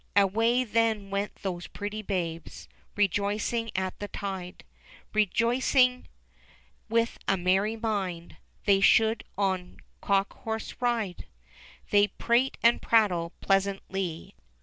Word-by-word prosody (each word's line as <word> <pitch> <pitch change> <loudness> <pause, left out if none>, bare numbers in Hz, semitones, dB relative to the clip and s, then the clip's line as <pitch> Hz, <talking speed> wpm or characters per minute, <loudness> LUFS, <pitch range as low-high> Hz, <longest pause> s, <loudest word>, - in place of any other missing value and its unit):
Away 225 +5 +3
then 220 -3 0
went 200 +1 -2
those 180 -3 -4
pretty 205 +1 -5
babes, 170 -5 -4 0.3
Rejoicing 205 +3 0
at 185 0 -2
that 205 - -7
tide. 190 -3 -5 0.5
Rejoicing 250 +4 +2 0.8
with 230 +1 +1
a 195 - +2
merry 190 +5 +1
mind 195 -7 -3 0.3
They 195 -1 +4
should 220 +2 +4
on 190 -3 -1 0.2
cock 195 0 +1
horse 220 0 -4
ride. 230 -7 -1 0.6
They 205 0 +5
prate 240 +6 +1
and 235 +1 +5
prattle 185 -7 +2
pleasantly. 195 -3 -1
205 Hz, 105 wpm, -28 LUFS, 190-225 Hz, 0.8 s, They